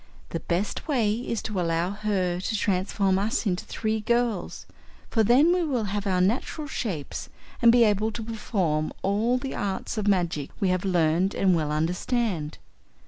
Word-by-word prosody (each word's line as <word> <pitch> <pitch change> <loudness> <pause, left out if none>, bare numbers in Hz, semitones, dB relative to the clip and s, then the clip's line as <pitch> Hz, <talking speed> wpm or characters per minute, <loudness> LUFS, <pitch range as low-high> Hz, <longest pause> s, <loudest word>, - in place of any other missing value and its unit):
The 165 - -3
best 180 - -2
way 235 -8 +2
is 230 0 -3
to 210 -3 -3
allow 170 +1 0
her 200 -4 -1
to 215 +4 -2
transform 195 -1 +1
us 215 +4 -1
into 185 -3 -1
three 220 -1 -2
girls, 235 -3 -1 0.5
for 225 - +3
then 270 +10 +5
we 360 - +1
will 260 -8 0
have 205 0 -2
our 185 -2 +2
natural 245 - 0
shapes 195 - -4 0.3
and 235 -1 +7
be 240 0 +6
able 215 0 +2
to 225 - -5
perform 190 -9 -1
all 215 +6 +2
the 265 +1 -4
Arts 200 +2 -3
of 210 - -2
Magic 170 -7 +1
we 195 - +2
have 185 +1 0
learned 175 +1 +2
and 185 -2 +3
well 155 -2 -1
understand. 170 +1 -1
200 Hz, 170 wpm, -26 LUFS, 180-230 Hz, 0.5 s, and